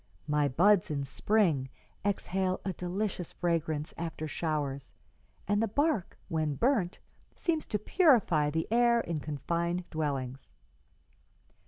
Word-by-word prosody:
My 150 -1 +2
buds 180 +8 +4
in 145 -2 -1
spring 155 -3 +1 0.3
exhale 190 -2 0
a 190 - -1
delicious 180 0 -3
fragrance 160 -3 -1
after 165 -2 -4
showers, 145 -4 -3 0.5
and 205 +2 +2
the 225 - +2
bark, 285 - 0
when 155 -4 -1
burnt, 220 - +1 0.4
seems 320 -3 -1
to 210 - 0
purify 210 - +3
the 160 +2 -1
air 235 0 +4
in 170 -6 -3
confined 170 +4 -2
dwellings.' 140 -4 -3
170 Hz, 120 wpm, -30 LUFS, 150-205 Hz, 0.5 s, buds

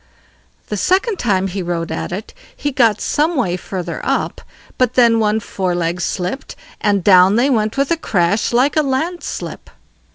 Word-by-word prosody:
The 210 - -2
second 380 - +1
time 195 -5 +1
he 195 0 -3
rode 170 -2 -3
at - - -4
it 195 +4 -6 0.2
he 290 - -2
got 230 -5 +3
some 315 +4 0
way 220 -10 0
further 180 -2 -5
up; - - -1 0.4
but 255 -1 +2
then 235 -2 +5
one 215 0 +2
fore 185 -4 -2
leg 175 0 -1
slipped, 185 +9 -3 0.3
and 200 -3 +1
down 185 +1 +6
they 255 +5 +3
went 215 0 0
with 275 +2 +1
a 335 - +2
crash 200 - 0
like 255 +4 +2
a 310 - +4
landslip. 310 +6 -3
215 Hz, 170 wpm, -18 LUFS, 185-265 Hz, 0.4 s, down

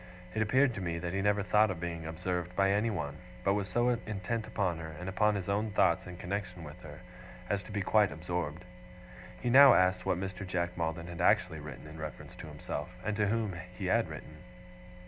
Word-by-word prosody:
It 110 - 0
appeared 130 +4 +4
to 100 - -5
me 85 -2 -2
that 85 +1 -3
he 100 - 0
never 105 0 +2
thought 105 +1 +4
of 90 -3 -3
being 85 -2 -4
observed 90 +2 -3
by 95 0 +3
anyone; 100 -9 0 0.3
but 100 - +3
was 100 -1 -1
so 120 +6 +2
intent 110 -1 -2
upon 90 -5 -1
her, 80 -1 -7
and 90 - -6
upon 105 +3 +2
his 95 -3 -3
own 105 +2 0
thoughts 95 -5 +2
in 90 -1 -8
connexion 90 -1 -4
with 80 +4 -10
her, 75 0 -10 0.5
as 100 0 0
to 105 - -11
be 100 -2 -1
quite 105 0 +4
absorbed. 85 0 -4 0.8
He 120 - 0
now 135 0 +10
asked 90 0 +3
what - - +1
Mr. 95 +1 -4
Jack 90 -2 -2
Maldon 85 0 -2
had 85 -1 -6
actually 90 -2 +3
written 75 -2 -9
in 75 +1 -10
reference 75 -4 -7
to - - -8
himself, 75 +4 -5 0.2
and 110 0 0
to 105 -1 +2
whom 110 -3 0 0.2
he 100 - -4
had 90 - +2
written? 75 - -9
90 Hz, 210 wpm, -32 LUFS, 85-105 Hz, 0.8 s, now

